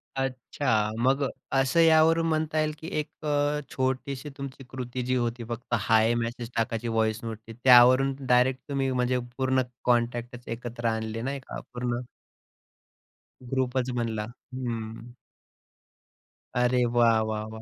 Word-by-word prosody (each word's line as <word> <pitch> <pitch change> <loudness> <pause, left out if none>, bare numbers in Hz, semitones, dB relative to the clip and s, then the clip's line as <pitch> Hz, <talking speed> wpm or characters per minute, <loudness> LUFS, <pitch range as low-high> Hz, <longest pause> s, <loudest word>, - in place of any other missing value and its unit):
अच्छा. 130 -4 0
मग 135 +3 +2
अ, - - +1 0.3
असं 135 +5 +1
यावरून 165 0 +5
म्हणता 155 0 0
येईल 155 0 +1
की 160 - -8
एक 150 +1 -7
अ, 145 0 +1
छोटीशी 130 +2 -2
तुमची 135 -1 -7
कृती 125 -1 -5
जी 130 0 +1
होती 120 -1 -1
फक्त 120 +1 -5
हाय 110 +2 +3
मेसेज 120 0 -3
टाकायची 115 0 -1
व्हॉइस 110 0 0
नोटनी 115 0 -7
त्यावरून 130 +2 +7
डायरेक्ट 125 +1 +3
तुम्ही 135 -1 0
म्हणजे 125 0 +1 0.2
पूर्ण 130 0 +2 0.2
कॉन्टॅक्टच 120 0 0
एकत्र 120 0 -6
आणले 110 0 -2
नाही 135 +2 -3
का - - -6
पूर्ण. 120 0 -2 1.5
ग्रुपच 130 -1 0
बनला. 110 -3 -1 0.3
हं. 115 -1 -5 1.5
अरे 125 0 +3
वाह, 115 -2 +5
वाह, 110 0 -2
वाह! 110 - -8
125 Hz, 135 wpm, -27 LUFS, 115-135 Hz, 1.5 s, त्यावरून